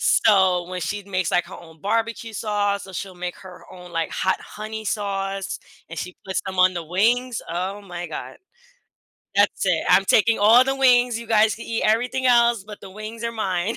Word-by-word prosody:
So, 190 -4 +3
when 185 0 -5
she 205 +5 -3
makes, 185 -3 -1
like, 175 - +2
her - - -10
own 160 -2 -16
barbecue 225 +2 -2
sauce, 205 -1 -1
so 190 - -11
she'll 185 0 -6
make 180 0 -5
her 185 -2 -13
own, 180 -1 -12
like, 165 -1 -1
hot 190 - 0
honey 220 +1 -7
sauce 195 -2 -3 0.3
and 165 - -6
she 180 0 -6
puts 190 -1 -1
them 190 -1 -5
on 185 0 +5
the 170 -2 -4
wings, 230 +8 +1
oh 185 +4 -3
my 175 -2 -6
god, 155 - -7 1.0
that's - - +2
it. - - +1
I'm 195 - +5
taking 225 +3 +3
all 220 +4 +7
the 270 +1 -1
wings, 245 -3 +4
you 235 - -9
guys 220 -1 +3
can 230 - -9
eat 230 - -2
everything 250 +4 +1
else, 235 -3 +4
but 210 0 -10
the 195 - -11
wings 215 +3 -8
are 230 - -2
mine. 195 -1 -1
200 Hz, 200 wpm, -23 LUFS, 185-225 Hz, 1.0 s, all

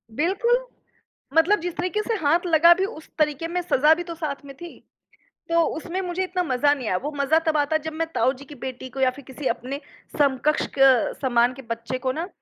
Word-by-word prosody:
बिल्कुल, 470 - +1 0.7
मतलब 340 +6 +4
जिस 350 0 -3
तरीक़े 370 +4 -1
से 460 - -1
हाथ 335 +5 +3
लगा 335 +1 +7
भी 380 +2 -1
उस 355 -7 -9
तरीक़े 300 +1 +1
में 355 +2 -2
सज़ा 305 -3 +4
भी 350 - -4
तो 340 -1 -7
साथ 295 -4 -5
में 275 -1 -10
थी। 345 -1 -10 0.7
तो 335 0 +3 0.2
उसमें 345 +3 -4
मुझे 360 0 -2
इतना 365 -1 -1
मज़ा 285 0 +2
नहीं 255 -6 -5
आया। 185 - +1
वो 295 - -3
मज़ा 280 +3 +3
तब 310 - +2
आता 295 +2 +2
जब 315 - -4
मैं 325 +1 -2
ताऊ 260 - +2
जी 280 +2 -13
की 290 - -12
बेटी 260 0 -7
को 270 - -8
या 260 -1 +4
फ़िर 275 0 -13
किसी 265 +1 -5
अपने 270 +4 -4 0.4
समकक्ष 280 +1 +2
क 265 -3 +5
समान 245 -2 +2
के 270 - -10
बच्चे 230 +2 -3
को 260 0 -1
ना 325 +5 -4
305 Hz, 220 wpm, -24 LUFS, 265-345 Hz, 0.7 s, लगा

